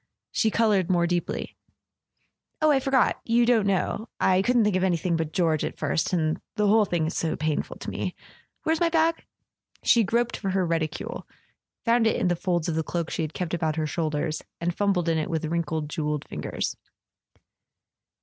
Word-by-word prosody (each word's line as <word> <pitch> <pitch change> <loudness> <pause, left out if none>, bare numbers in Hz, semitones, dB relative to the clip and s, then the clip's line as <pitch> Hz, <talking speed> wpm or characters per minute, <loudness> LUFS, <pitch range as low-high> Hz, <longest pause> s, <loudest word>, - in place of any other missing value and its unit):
She 220 - +2
coloured 210 -5 +2
more 175 -2 +3
deeply. 175 0 -2 1.0
"Oh, 310 -1 +4
I 275 - +4
forgot—you 250 -3 +2
don't 230 -4 +3
know. 200 +3 -1
I 185 0 +4
couldn't 240 +2 +3
think 210 -2 +2
of 185 - +1
anything 175 -1 +1
but 160 -1 -2
George 160 -4 +1
at - - -4
first... - - 0
and 160 -3 0
the 210 - +1
whole 215 +1 +5
thing 175 -4 0
is 160 - -3
so 165 - 0
painful 155 -1 -2
to - - -6
me... - - -3 0.5
Where's 320 0 +1
my 340 -1 +3
bag?" 325 0 +2 0.6
She 235 - +5
groped 235 +3 0
for 195 - -3
her 190 -1 +1
reticule, 165 -2 -3 0.6
found 230 -1 +4
it - - +2
in 185 - +1
the 175 - +2
folds 175 -1 -1
of 170 - 0
the 160 - 0
cloak 170 +1 -3
she - - -2
had 155 -1 -4
kept 175 -2 -3
about 160 -3 0
her 160 -1 -1
shoulders, 155 0 -2 0.2
and 170 0 -1
fum¬ 200 -1 +2
bled 175 -3 0
in 165 -1 +2
it 155 - -2
with 160 -2 -1
wrinkled 160 -1 -2
jewelled 150 -1 -3
fingers. - - -3
175 Hz, 190 wpm, -26 LUFS, 160-220 Hz, 1.0 s, whole